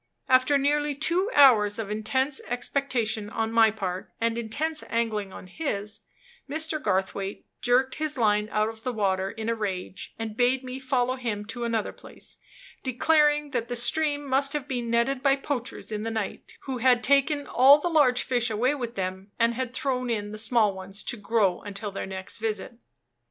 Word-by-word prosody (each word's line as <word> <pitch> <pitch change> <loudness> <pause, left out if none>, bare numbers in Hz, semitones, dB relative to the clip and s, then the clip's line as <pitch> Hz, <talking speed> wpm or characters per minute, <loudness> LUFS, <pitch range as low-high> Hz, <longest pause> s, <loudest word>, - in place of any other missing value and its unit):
After 260 +2 +4
nearly 290 +1 +1
two 350 +7 +1
hours 215 -8 +6
of 215 -2 -4
intense 260 +6 -1
expectation 240 -4 -1
on 225 0 -2
my 225 -1 +6
part, 190 -4 -4
and 230 0 +1
intense 280 +8 -1
angling 220 -4 -1
on - - -10
his, 205 - -4 0.5
Mr. 315 +1 0
Garthwaite 195 -1 -2 0.2
jerked 255 +2 +2
his 305 -2 -2
line 210 -2 +2
out 215 0 +1
of 225 0 -7
the 255 - -2
water 195 -4 0
in 220 +2 -6
a 230 - +2
rage, 190 -3 -5
and 225 -2 -5
bade 250 +2 +2
me 255 +1 -6
follow 255 -1 0
him 215 -5 -3
to 235 +2 -5
another 230 -2 -1
place, - - -10 0.4
declaring 295 +3 +2
that 240 -2 -2
the 245 - -3
stream 290 +4 0
must 275 +1 +1
have 295 -2 -3
been 245 -3 -3
netted 235 +3 +1
by 275 -1 +4
poachers 270 -5 -5
in 210 -1 -3
the 225 - -2
night, 220 -3 -4
who 260 -2 -4
had 245 0 +4
taken 280 +2 +3
all 270 +3 +7
the 300 - -2
large 290 -7 +4
fish 245 -2 +1
away 235 +6 +1
with 240 -5 -5
them, 190 +1 -4
and 230 0 +3
had 255 0 -3
thrown 255 -1 -2
in 205 -3 -2
the 215 - -6
small 220 -2 +3
ones 190 +2 -6
to - - -3
grow 205 -4 +1
until 205 0 -6
their 195 - -5
next 190 -1 -6
visit. 220 +2 -4
235 Hz, 185 wpm, -26 LUFS, 215-270 Hz, 0.5 s, all